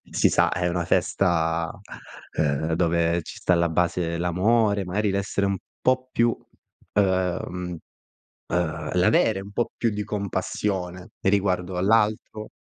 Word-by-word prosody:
si - - +3
sa, - - +3
è 90 0 0
una 85 0 -1
festa, 80 -2 +1 0.7
uhm, 75 +2 +1
dove 85 0 +1
ci - - -10
sta 90 - +2
alla 85 0 +2
base 85 0 0
l'amore, 100 +4 +2
mari, 100 +3 0
l'essere 100 0 0
un 100 0 0 0.2
po' 130 0 +1
più 115 0 +2 0.6
ehm, 90 -2 0 0.7
ehm, 80 -3 -2
l'avere 95 +2 +3
un 100 +1 -10
po' 120 +3 -1
più 115 - +1
di 105 -1 -3
compassione 95 -3 -3
riguardo 95 -2 +1
all'altro. 105 +2 +1
90 Hz, 130 wpm, -25 LUFS, 85-100 Hz, 0.7 s, si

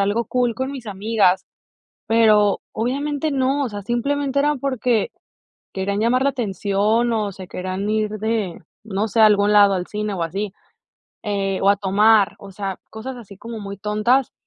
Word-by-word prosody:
algo 205 +3 0
cool 245 -2 0
con 260 +3 -3
mis 260 -5 -8
amigas, 200 -2 +1 0.6
pero 215 -3 +4
obviamente 285 +6 -1
no, 275 +1 +1
o 260 - -1
sea, 205 -1 -7
simplemente 280 +5 0
era 295 0 +2
porque 250 -4 0 0.6
querían 200 +1 -2
llamar 240 +4 +2
la 280 - +3
atención 215 0 0
o 210 -3 -1
se 185 -1 -10
querían 185 +3 -3
ir 215 -1 0
de, 220 -5 -2 0.2
no 210 +1 -2
sé, 225 - -3
a 220 - +9
algún 205 0 +3
lado 200 -1 +6
al 180 -1 -3
cine 210 -1 -3
o 175 - -3
así, 195 +4 -3 0.7
eh, 195 -2 -1
o 200 - +5
a 200 - +3
tomar, 205 +1 +3
o 200 - -11
sea, 195 -1 -4
cosas 250 +4 -7
así 200 -5 -12
como 230 +1 -7
muy 200 -1 -7
tontas, 215 +5 +1
215 Hz, 175 wpm, -21 LUFS, 200-240 Hz, 0.7 s, a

